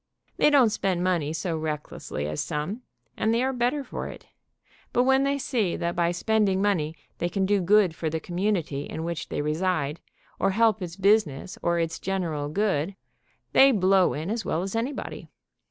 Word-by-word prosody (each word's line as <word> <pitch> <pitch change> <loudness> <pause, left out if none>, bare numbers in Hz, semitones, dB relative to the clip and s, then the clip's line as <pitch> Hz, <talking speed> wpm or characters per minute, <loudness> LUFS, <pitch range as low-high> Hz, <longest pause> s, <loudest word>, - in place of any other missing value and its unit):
They - - +5
don't 265 -7 +5
spend 190 -4 0
money 170 -5 +1
so 160 +2 -2
recklessly 150 - -4
as 75 0 -2
some, 170 +9 -3 0.3
and 220 - +1
they 235 +2 +2
are 265 +1 0
better 250 +4 0
for - - -5
it, - - -10 0.7
but 245 - +4
when 265 +1 +4
they 280 0 +1
see 235 -9 0
that 170 0 -2
by 170 -1 +2
spending 195 +2 +1
money 170 -6 +1 0.2
they 175 - 0
can 190 +2 0
do 200 0 +2
good 195 -1 +4
for 160 0 -3
the 160 +1 -2
community 175 -5 -1
in 160 - -5
which 170 -1 -4
they - - -2
reside, 155 -1 -1 0.4
or 195 - +2
help 220 +1 +3
its 175 -2 -5
business 195 -5 +1
or 170 0 +1
its 165 -1 -1
general 165 -6 -2
good, 190 -1 0 0.6
they 270 0 +7
blow 190 -4 +3
in 160 +7 -3
as 225 0 -2
well 165 - -1
as 195 +3 -4
anybody. 245 +5 -4
185 Hz, 185 wpm, -26 LUFS, 160-215 Hz, 0.7 s, they